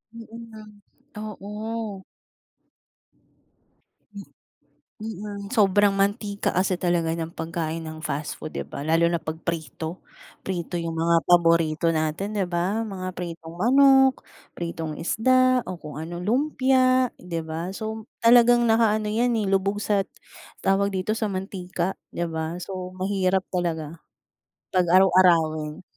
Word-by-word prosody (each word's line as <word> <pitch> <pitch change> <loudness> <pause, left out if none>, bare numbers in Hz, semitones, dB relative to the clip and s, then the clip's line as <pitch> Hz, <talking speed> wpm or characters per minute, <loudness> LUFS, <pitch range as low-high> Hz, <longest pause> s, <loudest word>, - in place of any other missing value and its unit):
Mm 230 -1 -9 0.2
nga, 220 -1 -11 0.8
oo. 210 0 -5 3.0
Mm, 205 -1 -6
sobrang 205 -3 +3
mantika 200 +1 0
kasi 185 0 +1
talaga 170 -2 0
ng 165 0 -4
pagkain 165 -1 -3
ng 155 0 -8
fast 145 +2 -2
food, 155 - -8
'di - - -5
ba, 140 - -6
lalo 165 +2 +3
na 170 - 0
pag 160 -1 -5
prito. 160 +1 -5 0.4
Prito 175 -1 -4
yung 165 -1 -2
mga 165 -1 +3
paborito 165 -2 +3
natin, 165 +6 -1
'di 200 - +1
ba? 180 +5 -1
Mga 185 -3 -6
pritong 165 -2 -7
manok, 265 +5 +5 0.3
pritong 165 -2 -5
isda, 255 +7 +3
o 180 -2 -7
kung 150 -1 -9
ano, 165 +3 -6
lumpia 255 +2 +2
'di 170 -2 -5
ba? 165 +4 -4
So 220 +2 -5 0.2
talagang 240 0 +6
nakaano 220 -1 +3
’yan, 230 +2 +1
eh, 205 - -1
lubog 195 +1 +1
sa 200 -2 +1 0.6
tawag 200 +1 +1
dito, 190 +3 -1
sa 215 -2 -1
mantika, 185 -1 -3 0.2
’di 170 0 -2
ba? 160 +2 -4
So, 185 -1 -6
mahirap 190 0 0
talaga 165 -3 -3 0.7
pag 180 -2 +2
araw-arawin. 170 -4 +3
185 Hz, 125 wpm, -24 LUFS, 165-215 Hz, 3.0 s, talagang